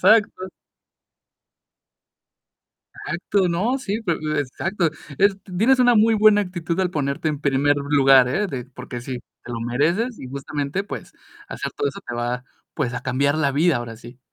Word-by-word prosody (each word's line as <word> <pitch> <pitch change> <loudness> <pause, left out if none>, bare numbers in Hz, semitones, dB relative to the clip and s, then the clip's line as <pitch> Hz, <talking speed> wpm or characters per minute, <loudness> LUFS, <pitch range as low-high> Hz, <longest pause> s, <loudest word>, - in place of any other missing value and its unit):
Exacto. 205 -4 +3 2.6
Exacto, 185 +1 0
¿no?, 215 +11 0
sí, 215 -3 -3
pe 175 -5 0 0.3
exacto. 170 +5 -1 0.3
Es 200 0 +4 0.2
tienes 255 +5 +4
una 245 -1 +5
muy 225 +1 +5
buena 210 -1 +5
actitud 175 -2 -4
al 180 -1 +1
ponerte 145 0 -1
en 150 -1 -3
primer 145 0 +2
lugar, 135 -3 +5
¿eh?, 205 +10 0
de 130 -8 -5
porque 125 -2 -8
sí, 125 +1 -5 0.3
te 120 - -7
lo 115 - -4
mereces 165 - 0
y 130 - -8
justamente, 140 +6 -3
pues - - -8 0.4
hacer - - -4
todo 430 - 0
eso 200 - -8
te 120 - -4
va, 120 +1 -2 0.3
pues 125 -5 -2
a 125 - -4
cambiar 140 +3 +1
la 145 -3 +2
vida 155 +1 +3
ahora 115 -2 -6
sí. 120 +2 -13
150 Hz, 165 wpm, -22 LUFS, 130-200 Hz, 2.6 s, una